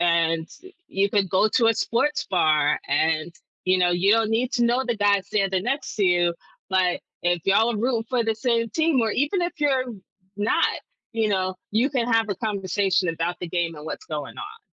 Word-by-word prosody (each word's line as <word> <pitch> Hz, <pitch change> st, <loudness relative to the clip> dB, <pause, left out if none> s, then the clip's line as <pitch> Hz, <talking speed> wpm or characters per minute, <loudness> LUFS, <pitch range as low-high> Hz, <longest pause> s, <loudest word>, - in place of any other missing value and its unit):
and 165 Hz, -1 st, +2 dB, 0.4 s
you 195 Hz, +1 st, +1 dB
could 200 Hz, -3 st, +1 dB
go 200 Hz, +3 st, +3 dB
to 235 Hz, -3 st, +4 dB
a 225 Hz, -, +3 dB
sports 290 Hz, +9 st, 0 dB
bar, 155 Hz, -4 st, +2 dB
and, 160 Hz, +1 st, +1 dB, 0.3 s
you 185 Hz, 0 st, +3 dB
know, 180 Hz, -1 st, +3 dB
you 180 Hz, +4 st, +3 dB
don't 225 Hz, -1 st, +2 dB
need 240 Hz, +3 st, 0 dB
to 240 Hz, -, +2 dB
know 245 Hz, +3 st, +1 dB
the 240 Hz, -3 st, -1 dB
guy 205 Hz, -1 st, +3 dB
standing 195 Hz, -1 st, -1 dB
next 275 Hz, +4 st, -2 dB
to 205 Hz, -, +2 dB
you, 175 Hz, -1 st, +2 dB, 0.4 s
but 185 Hz, -2 st, +1 dB, 0.2 s
if 175 Hz, -1 st, +1 dB
y'all 220 Hz, +4 st, +3 dB
are 210 Hz, -, -3 dB
rooting 230 Hz, -1 st, 0 dB
for 250 Hz, -2 st, +1 dB
the 225 Hz, 0 st, 0 dB
same 230 Hz, 0 st, 0 dB
team, 315 Hz, -4 st, +2 dB
or 225 Hz, -1 st, +1 dB
even 295 Hz, +7 st, 0 dB
if 345 Hz, -, -1 dB
you're 270 Hz, -3 st, +1 dB, 0.5 s
not, 210 Hz, +2 st, +2 dB, 0.5 s
you 225 Hz, -1 st, 0 dB
know, 185 Hz, -1 st, 0 dB, 0.2 s
you 230 Hz, +6 st, +2 dB
can 245 Hz, -4 st, 0 dB
have 225 Hz, -1 st, +2 dB
a 200 Hz, -, -1 dB
conversation 195 Hz, -3 st, 0 dB
about 165 Hz, +2 st, -2 dB
the 175 Hz, -, -5 dB
game 170 Hz, -1 st, -1 dB
and 150 Hz, -, -10 dB
what's -, -, -6 dB
going 150 Hz, -3 st, -6 dB
on. 430 Hz, +2 st, -8 dB
205 Hz, 205 wpm, -24 LUFS, 175-235 Hz, 0.5 s, to